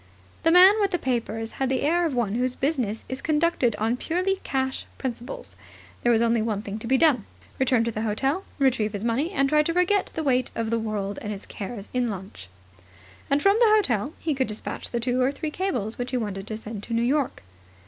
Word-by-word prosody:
The - - +3
man 375 +5 +7
with 400 - +3
the 355 - 0
papers 230 -5 -2
had 265 -1 -2
the 265 - 0
air 340 +3 +2
of 285 - -3
one 230 -5 0
whose 250 +2 0
business 255 -7 -1
is 260 +1 -5
conducted 305 -7 +1
on 225 +3 0
purely 370 +7 0
cash 265 -1 -2
principles. 260 - -5 0.5
There 240 - +3
was 230 0 +4
only 230 -1 +2
one 215 -2 -2
thing 205 +1 -5
to 230 - -7
be 265 +2 +4
done, 270 -8 +3 0.3
return 255 -3 +3
to 230 - -1
the 215 - -4
hotel, 270 - 0
retrieve 245 -6 +2
his 205 0 -4
money, 240 +8 0
and 275 -8 +1
try 300 +2 +4
to 330 +2 -1
forget 360 +3 +2
the 320 - -2
weight 255 -3 +2
of 225 -1 -2
the 230 - +1
world 205 -3 -3
and 210 - -4
its 200 -1 -7
cares 205 0 -7
in 250 -1 +1
lunch. 185 - -8 0.8
And 280 +1 +2
from 395 +2 +5
the 470 -2 +6
hotel 270 - +1
he 320 - -1
could 260 -1 0
despatch 215 0 -5
the 235 - -2
two 250 +2 0
or 255 +2 +3
three 300 +2 -4
cables 250 - -2
which 245 +1 -2
he 255 - -1
wanted 205 -4 -4
to 215 - -4
send 220 -2 -7
to 230 +3 -4
New 230 - +2
York. 270 - 0
250 Hz, 225 wpm, -25 LUFS, 220-300 Hz, 0.8 s, man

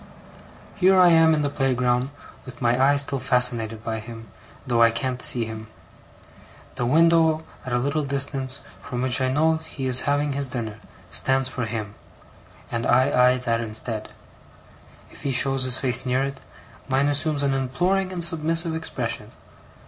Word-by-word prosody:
Here 190 -1 +4
I 180 -1 +7
am 165 -1 +5
in 150 - -1
the 145 - 0
playground, 125 -2 0 0.3
with 125 -2 -12
my 120 +1 +2
eye 140 +1 +4
still 140 -1 +2
fascinated 125 -4 +1
by 110 -1 -3
him, 115 0 -11 0.3
though 120 -3 +1
I 115 - +7
can't 125 +2 -3
see 120 -2 +1
him. 110 0 -8 1.1
The 120 - -2
window 160 +2 +3 0.2
at - - -4
a 120 - +1
little 140 +5 -1
distance 135 -1 -1 0.2
from 125 -1 -4
which 130 0 +2
I 130 0 +1
know 160 +3 +2
he 160 -4 -7
is 130 -1 +4
having 145 0 0
his 140 0 -3
dinner, 115 -4 -5 0.3
stands 130 0 0
for 125 -2 -3
him, 110 -2 -5 0.8
and 115 0 -2
I 130 +2 +3 0.2
eye - - -2
that 115 -2 -1
instead. 110 0 -5 1.0
If - - -14
he 140 - -2
shows 135 0 +3
his 130 0 +1
face 125 -1 -2
near 130 +1 0
it, 135 0 -5 0.5
mine 135 +1 +1
assumes 145 0 0
an 140 -1 +1
imploring 180 +9 0
and 175 -2 -3
submissive 165 0 +1
expression. 160 0 -4
130 Hz, 165 wpm, -23 LUFS, 120-145 Hz, 1.1 s, I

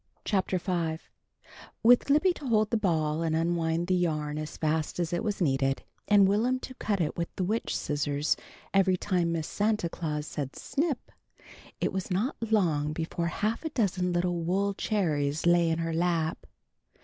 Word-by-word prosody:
CHAPTER 190 -2 +1
V 170 -3 -1 0.9
WITH 245 +4 +6
Libby 305 +6 +4
to 290 - -8
hold 215 -2 +2
the - - +2
ball 160 -7 +1
and 160 -1 0
unwind 165 0 0
the 185 - +1
yarn 155 -4 0
as 155 0 -6
fast 155 +1 -1
as 175 -1 -1
it 175 - 0
was 210 -2 -2
needed, 135 -5 +1 0.2
and 200 -2 +6
Will'm 235 +6 +2
to 260 - -7
cut 210 -6 -1
it 160 - -1
with 170 -1 -1
the 185 - -1
witch 215 +5 -1
scissors 145 -1 0 0.4
every 190 -1 +4
time 175 -3 0
Miss 165 -2 -1
Santa 210 -4 0
Claus 150 -3 -3
said 145 -2 -5
"snip!" 295 -3 -2 0.7
it - - -1
was 190 -1 -3
not 200 +9 0
long 155 -9 +2
before 170 +1 -2
half 215 - -1
a 320 - -2
dozen 190 - 0
little 175 0 0
wool 195 +4 0
cherries 155 -9 0
lay 175 -1 +4
in 160 - +1
her 165 0 -2
lap. 165 -1 0
175 Hz, 175 wpm, -28 LUFS, 160-205 Hz, 0.9 s, WITH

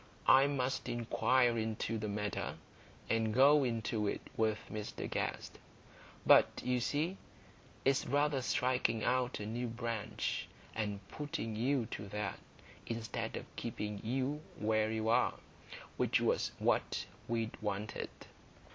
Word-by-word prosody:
I 135 +1 +7
must 135 -2 -1
inquire 120 +1 +2
into 110 0 -1
the 105 - -2
matter, 105 0 -2 0.5
and 110 -1 +1
go 140 +5 +6
into 115 -3 0
it - - -1
with 110 -1 +2
Mr 105 -1 -4
Guest. - - -3 0.7
But, - - +6
you 125 0 +2
see, 155 +10 0 0.7
it's 135 0 +3
rather 145 +1 +2
striking 125 -3 +1
out 125 0 +1
a 105 - -4
new 120 +3 -2
branch, 115 -2 -2 0.3
and 105 -3 -3
putting 125 -7 -4
you 125 +2 +1
to 100 - -5
that, 105 -1 -3 0.5
instead 115 -3 -3
of - - -6
keeping 105 -1 -4
you 135 +6 -1 0.2
where 110 0 +2
you 110 0 -1
are, 115 - +3 0.6
which - - +3
was - - +1
what - - +1 0.2
we'd 115 -1 -1
wanted." 105 0 -3
115 Hz, 130 wpm, -35 LUFS, 110-130 Hz, 0.7 s, I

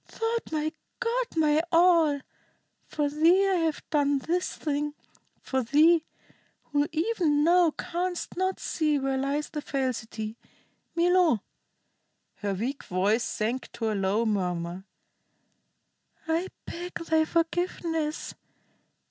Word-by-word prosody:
Thou'rt 455 -3 -3
my 310 0 -1 0.3
god, - - 0
my 310 -1 +3
all. 330 -4 +5 0.7
For 295 -1 -1
thee 335 +7 +4
I 380 -1 +2
have 325 -3 -1
done 285 -2 +3
this 350 +7 -1
thing. 295 -1 -2 0.5
For 265 0 0
thee, 310 +6 +4 0.7
who 290 0 +2
even 320 -4 +1
now 345 +1 +5
canst 355 +3 -3
not 375 +1 -1
see 305 -3 0
where 270 -1 -1
lies 280 +2 -1
the 300 - -4
falsity. 235 -6 -3 0.6
Milo" 345 - +3 0.9
her 200 -2 -2
weak 250 +8 -3
voice 200 +6 +1
sank 235 +4 -2
to 225 -2 -1
a - - 0
low 200 +3 +1
murmur 180 -3 -2 1.4
"I 330 +3 0 0.2
beg 355 +2 -7
thy 320 -1 +2
forgiveness. 325 -1 -1
305 Hz, 115 wpm, -27 LUFS, 260-340 Hz, 1.4 s, all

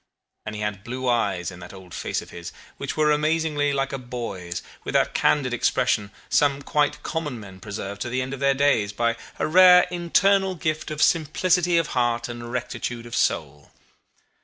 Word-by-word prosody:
And 110 - -4
he 105 - -5
had 105 -2 -3
blue 130 +3 -4
eyes 100 -7 0
in 90 - -11
that 90 +2 -10
old 95 -3 -13
face - - -3
of - - -15
his, 85 -1 -8 0.3
which - - -5
were 155 -1 +4
amazingly 150 -1 +1
like 135 0 -1
a 135 - -3
boy's, 115 -9 -5 0.2
with - - -5
that - - +2
candid 135 -4 +2
expression 120 -4 +1 0.2
some 140 -1 +2
quite 145 0 0
common 150 -7 -3
men 95 -3 -11
preserve 100 0 -6
to 120 - -3
the 130 +2 -1
end 130 +1 -5
of 135 - -6
their 140 0 +3
days 135 -8 +2
by 115 +2 +1 0.2
a - - 0
rare 180 +2 +7
internal 190 +2 +2
gift 155 -1 -2
of 155 0 0
simplicity 170 +2 +2
of 165 -2 +1
heart 120 -1 +1
and 120 -1 -7
rectitude 120 -1 -4
of 120 +1 -6
soul. 75 - -1
125 Hz, 185 wpm, -24 LUFS, 105-155 Hz, 0.3 s, rare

